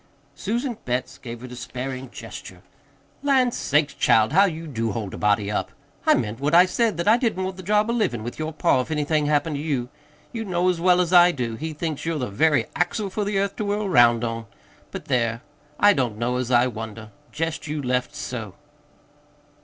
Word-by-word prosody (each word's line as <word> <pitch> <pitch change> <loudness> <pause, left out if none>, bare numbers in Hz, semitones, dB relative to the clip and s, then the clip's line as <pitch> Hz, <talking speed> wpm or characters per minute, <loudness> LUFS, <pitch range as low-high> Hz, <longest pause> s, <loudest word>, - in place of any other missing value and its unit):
Susan 235 - -3
Betts 125 +1 -3
gave 120 -1 -8
a - - -6
despairing 130 +1 -6
gesture. - - -10 0.6
"Lan' 265 -3 +3
sakes, 150 - +1
child, 110 +4 +3
how 195 +4 +6
you 165 -3 -4
do 115 -7 -2
hold 105 -4 -4
a - - -6
body 105 0 +1
up! - - -2 0.4
I - - +7
meant 115 -2 -2
what 145 +4 +1
I 175 +1 +8
said 220 0 0
that 170 - -2
I 220 +2 +6
didn't 225 -6 -1
want 190 0 -3
the 185 - -9
job 210 +3 +2
of 235 +1 0
livin' 120 - 0
with 120 +5 -7
your 155 0 -2
pa 140 -4 +2
if 125 - -7
anything 150 -1 0
happened 150 0 +1
to - - -4
you. 135 -6 -2 0.4
You 225 -1 -3
know 180 -2 +1
as 175 -2 -1
well 180 0 +4
as 180 0 -1
I 175 0 +8
do 125 -7 -3
that 110 - -8
he 160 +1 -4
thinks 155 -1 -4
you're 165 -1 -1
the 125 -7 -3
very 145 +2 +3
axle 195 +3 -1
for 210 +2 -2
the 205 0 -1
earth 200 0 0
to - - -2
whirl 205 +1 -1
'round 120 -8 +5
on. 115 -1 -3 0.4
But, - - -7
there, 115 -3 0 0.4
I 205 0 +6
don't 120 -6 -1
know 120 +2 -1
as 125 -1 -2
I 120 -1 +4
wonder 110 -2 -6 0.2
jest 165 0 -3
you 150 0 -3
left, 125 -2 -1
so!" 110 -6 -6
150 Hz, 215 wpm, -23 LUFS, 120-185 Hz, 0.6 s, I